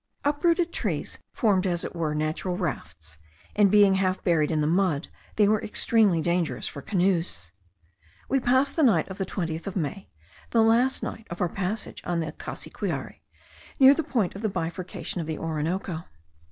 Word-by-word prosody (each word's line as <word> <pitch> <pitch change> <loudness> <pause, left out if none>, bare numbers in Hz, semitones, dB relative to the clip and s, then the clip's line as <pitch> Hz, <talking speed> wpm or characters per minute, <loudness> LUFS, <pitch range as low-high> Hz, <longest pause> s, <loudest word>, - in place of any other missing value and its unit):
Uprooted 335 +4 +2
trees - - -3
formed 195 -4 +2
as 175 -1 -1
it - - -6
were 155 -3 -1
natural 155 +4 -2
rafts; 80 - -5 0.4
and 205 -1 +5
being 205 -1 +6
half 190 -1 0
buried 160 -5 +2
in 155 - 0
the 150 - +1
mud, 170 -2 +1 0.3
they 210 -1 +4
were 215 0 +2
extremely 210 -5 +2
dangerous 170 0 -1
for 140 - -7
canoes. 175 - 0 0.8
We 270 - +2
passed 260 +3 +2
the 325 - +1
night 215 - +4
of 190 - -8
the 190 - -1
20th 165 -3 -3
of 195 - -4
May, 185 +2 -3 0.4
the 225 -1 +4
last 235 +4 +3
of 215 -6 -6
our 180 - +1
passage 195 +5 -4
on 175 -1 -1
the 160 -2 -2
Cassiquiare, - - -5 0.6
near 270 0 +9
the 325 - 0
point 240 - -1
of 200 - -8
the 220 - 0
bifurcation 175 0 -4
of 160 - -6
the 160 -1 -3
Orinoco. 165 +2 -3
185 Hz, 170 wpm, -26 LUFS, 165-215 Hz, 0.8 s, near